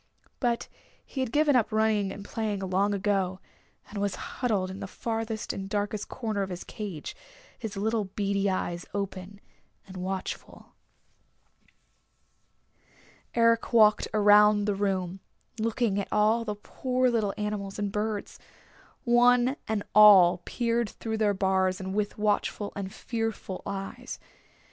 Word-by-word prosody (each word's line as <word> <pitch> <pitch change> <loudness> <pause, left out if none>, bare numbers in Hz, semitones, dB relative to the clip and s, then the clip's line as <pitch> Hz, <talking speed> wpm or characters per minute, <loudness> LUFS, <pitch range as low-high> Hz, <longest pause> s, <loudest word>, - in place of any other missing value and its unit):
But 240 -2 0 0.4
he 270 - -7
had 260 -3 -1
given 295 0 +3
up 235 -4 +2
running 215 -2 +2
and 200 +1 -8
playing 210 -2 -3
long 195 +3 +1
ago, 195 -2 0 0.5
and 205 - -6
was 200 -1 -1
huddled 205 -7 -2
in 190 - -8
the - - -5
farthest 225 +1 -3
and 195 0 -6
darkest 205 0 -2
corner 220 -5 -3
of 195 - -2
his 180 -1 -6
cage, 195 -8 -6 0.4
his 220 -4 -5
little 220 +1 0
beady 200 0 -1
eyes 175 -2 -2
open 200 0 -5 0.5
and 190 -1 -10
watchful. 185 +1 -5 2.6
Eric 230 0 +3
walked 215 -2 +5
around 210 -1 +5
the 205 - +1
room, 195 -2 -1 0.4
looking 225 -2 0
at 200 - -3
all 220 +2 +3
the 210 -1 -3
poor 255 +4 0
little 215 -4 0
animals 210 -2 -3
and 205 -1 -2
birds. 210 0 -3 0.6
One 245 +2 +4
and 215 -2 -1
all 190 -4 +8
peered 235 -2 0
through 220 +2 -4
their 205 -2 +2
bars 190 0 +1
with 200 +2 -2
watchful 210 0 0
and 195 -1 -4
fearful 225 -5 -4
eyes. 195 -1 -5
205 Hz, 135 wpm, -28 LUFS, 195-225 Hz, 2.6 s, all